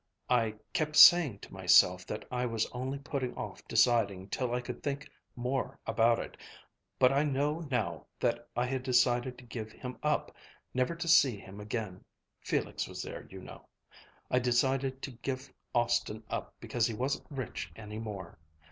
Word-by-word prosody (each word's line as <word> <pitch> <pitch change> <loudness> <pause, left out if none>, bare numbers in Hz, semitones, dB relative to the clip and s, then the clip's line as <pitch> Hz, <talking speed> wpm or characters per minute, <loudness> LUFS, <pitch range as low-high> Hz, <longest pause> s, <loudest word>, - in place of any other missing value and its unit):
I 115 -3 +2 0.2
kept 155 -1 0
saying 155 - +8
to - - -12
myself - - +5
that - - -5
I 125 0 -1
was 115 -2 0
only 130 +2 -3
putting 135 -3 -3
off - - -6
deciding 100 -6 +2
till 125 +2 -1
I 125 - 0
could 125 - -7
think 145 +1 -3 0.3
more 125 +2 -2
about 115 +1 +3
it, - - -6 0.6
but 125 - +5
I 140 - +3
know 150 +2 0
now 110 -11 -2
that - - -1
I 120 +1 +1
had 130 0 -2
decided 125 0 +2
to - - -13
give 115 -2 -6
him 125 +2 -8
up, 150 0 0 0.4
never 130 +6 0
to 170 +1 -5
see 135 -8 +6
him 100 +1 -11
again 105 -3 -4 0.4
Felix - - -2
was - - -6
there, - - -8
you - - -9
know - - -12 0.6
I'd 125 - +3
decided 130 +2 +1
to 140 - -4
give 130 +3 -5 0.2
Austin 120 -2 +1
up - - -4
because 115 -2 0
he 115 - -4
wasn't 130 +5 -2
rich 135 -4 -5
any 105 -1 -7
more. 100 -8 -7
125 Hz, 170 wpm, -31 LUFS, 115-135 Hz, 0.6 s, saying